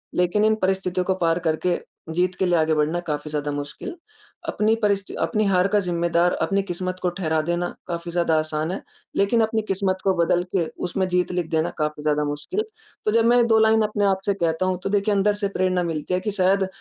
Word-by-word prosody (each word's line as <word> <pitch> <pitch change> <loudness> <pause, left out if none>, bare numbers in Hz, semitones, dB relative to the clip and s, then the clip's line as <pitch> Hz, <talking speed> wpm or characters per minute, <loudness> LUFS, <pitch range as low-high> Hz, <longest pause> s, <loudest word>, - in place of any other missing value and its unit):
लेकिन 180 +4 +2
इन 220 0 +4
परिस्थितियों 185 -1 0
को 190 - +2
पार 165 +1 +2
करके 170 +3 +1 0.4
जीत 180 +1 +1
के 190 - +2
लिए 175 -1 +2
आगे 160 0 +2
बढ़ना 155 +3 +1
काफ़ी 150 0 -3
ज़्यादा 145 -1 -2
मुश्किल। 145 - -6 0.5
अपनी 220 +1 +2
परिस्थि 200 -1 0
अपनी 215 -2 +1
हार 185 -1 +3
का 205 +1 +2
ज़िम्मेदार 170 -1 +1
अपनी 195 0 +1
किस्मत 185 0 -4
को 180 - +1
ठहरा 160 -3 -1
देना 175 +2 -1 0.2
काफ़ी 170 0 -4
ज़्यादा 170 -2 +1
आसान 155 +2 -2
है। 195 - -4 0.3
लेकिन 225 +4 +3
अपनी 220 0 +1
किस्मत 190 -1 0
को 190 -1 +3
बदल 175 +1 +2
के 170 -3 +2 0.2
उसमें 190 +1 -1
जीत 180 0 +1
लिख 175 -2 -2
देना 160 +1 +1
काफ़ी 150 -1 -2
ज़्यादा 150 -1 +1
मुश्किल। 150 - -2 0.4
तो 215 - +2
जब 230 +1 +3
मैं 240 0 +5
2 220 -1 +4
लाइन 220 0 +4
अपने 210 -1 0
आप 190 -1 +2
से 200 - +2
कहता 170 -1 0
हूँ 185 -1 0
तो - - -1
देखिए 205 +1 +1
अंदर 205 +1 +3
से - - +3
प्रेरणा 185 -1 +1
मिलती 165 +1 -3
है 180 - +2
कि 210 +3 -3
शायद 190 0 +2
180 Hz, 220 wpm, -23 LUFS, 170-200 Hz, 0.5 s, मैं